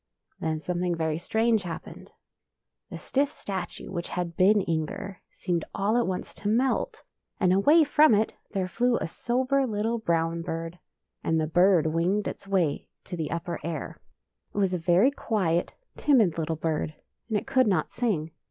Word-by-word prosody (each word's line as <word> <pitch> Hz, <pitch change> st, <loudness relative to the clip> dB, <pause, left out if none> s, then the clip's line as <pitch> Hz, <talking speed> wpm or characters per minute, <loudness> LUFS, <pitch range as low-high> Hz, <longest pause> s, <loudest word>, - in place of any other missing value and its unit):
" -, -, -46 dB
Then 160 Hz, -1 st, -1 dB
something 175 Hz, +2 st, -1 dB
very 160 Hz, -1 st, -1 dB
strange 225 Hz, +4 st, +2 dB
happened. 175 Hz, -3 st, -8 dB, 0.8 s
The -, -, -6 dB
stiff 280 Hz, +1 st, 0 dB
statue 190 Hz, -9 st, -5 dB
which 175 Hz, -2 st, -4 dB
had 175 Hz, -2 st, -3 dB
been 205 Hz, +4 st, +5 dB
Inger, 180 Hz, +4 st, -3 dB
seemed 175 Hz, -3 st, -2 dB
all 205 Hz, +3 st, +1 dB
at 240 Hz, -, +2 dB
once 185 Hz, -1 st, -3 dB
to 205 Hz, -, -6 dB
melt, 245 Hz, +5 st, 0 dB, 0.4 s
and 180 Hz, 0 st, +3 dB
away 295 Hz, -, +6 dB
from 300 Hz, -4 st, +5 dB
it 215 Hz, +2 st, 0 dB
there 190 Hz, -3 st, -2 dB
flew 240 Hz, +6 st, +1 dB
a -, -, -2 dB
sober 260 Hz, +8 st, 0 dB
little 225 Hz, +2 st, -1 dB
brown 165 Hz, -4 st, 0 dB
bird. 165 Hz, +1 st, -5 dB, 0.4 s
And 160 Hz, 0 st, +1 dB
the 155 Hz, -, +1 dB
bird 175 Hz, +1 st, +4 dB
winged 170 Hz, +6 st, +1 dB
its -, -, -7 dB
way 180 Hz, -7 st, 0 dB, 0.2 s
to -, -, -6 dB
the 160 Hz, -3 st, -3 dB
upper 170 Hz, +1 st, -3 dB
air. 160 Hz, -3 st, -5 dB, 0.6 s
It -, -, -7 dB
was 195 Hz, -2 st, +2 dB
a 180 Hz, -, 0 dB
very 180 Hz, -, +4 dB
quiet, 185 Hz, -10 st, -1 dB, 0.2 s
timid 220 Hz, -, +3 dB
little 160 Hz, 0 st, -1 dB
bird, 155 Hz, -1 st, -2 dB, 0.3 s
and 220 Hz, -, +1 dB
it -, -, -4 dB
could 260 Hz, -2 st, +3 dB
not 180 Hz, -7 st, +1 dB
sing. 190 Hz, -10 st, -1 dB
185 Hz, 170 wpm, -27 LUFS, 165-220 Hz, 0.8 s, away